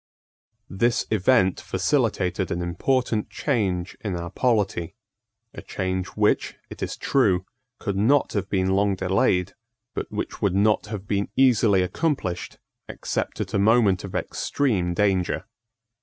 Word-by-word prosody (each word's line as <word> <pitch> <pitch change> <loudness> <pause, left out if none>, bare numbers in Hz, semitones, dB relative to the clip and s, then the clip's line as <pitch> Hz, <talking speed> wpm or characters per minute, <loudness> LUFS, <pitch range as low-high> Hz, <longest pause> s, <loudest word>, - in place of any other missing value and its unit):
This 115 +5 +1
event 95 -2 +3
facilitated 100 - 0
an 85 +1 -2
important 110 +5 0
change 95 -10 -1
in 100 -4 -2
our 85 0 -5
polity, 100 -7 0 0.6
a - - -8
change 95 -1 -3
which, 105 0 +2 0.2
it - - -9
is - - -3
true, 95 -9 +2 0.3
could 100 -3 -3
not 125 +8 +2
have 100 -2 -2
been 95 -1 +1
long 100 0 +2
delayed, 95 0 +1 0.4
but - - -5
which - - -5
would 95 -2 +1
not 105 +1 +2
have 105 -2 -6
been 100 0 -1
easily 115 -7 +4
accomplished 95 - -2 0.3
except - - -3
at - - -5
a - - +2
moment 105 -3 +4
of - - -7
extreme 95 -11 -1
danger. 95 -3 +1
100 Hz, 135 wpm, -24 LUFS, 95-110 Hz, 0.6 s, easily